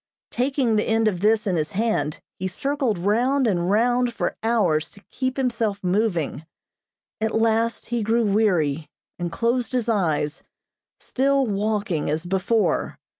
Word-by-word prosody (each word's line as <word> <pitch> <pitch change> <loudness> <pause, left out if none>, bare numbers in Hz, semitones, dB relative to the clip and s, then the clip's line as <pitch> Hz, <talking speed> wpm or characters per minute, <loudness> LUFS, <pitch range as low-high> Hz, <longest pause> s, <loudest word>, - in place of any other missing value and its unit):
Taking 250 -3 +1
the 210 - 0
end 225 0 +2
of 180 -5 -1
this 215 +2 +3
in 185 -4 0
his 155 +2 -2
hand, 215 -7 0 0.2
he 190 - -1
circled 265 - -1
round 245 +9 +2
and 180 -5 +1
round 240 +3 +2
for - - -2
hours 205 -10 +1
to 200 - -17
keep 260 0 -2
himself 230 -6 -1
moving. 180 -6 0 0.8
At 220 0 0
last 225 +1 +1
he 240 0 -2
grew 225 +2 +1
weary, 175 -8 +1 0.3
and 175 -1 -3
closed 235 +6 0
his 245 -2 0
eyes, 160 -8 0 0.6
still 275 +1 +1
walking 205 -6 -1
as 155 +3 -1
before. 195 +5 0
220 Hz, 145 wpm, -23 LUFS, 185-235 Hz, 0.8 s, this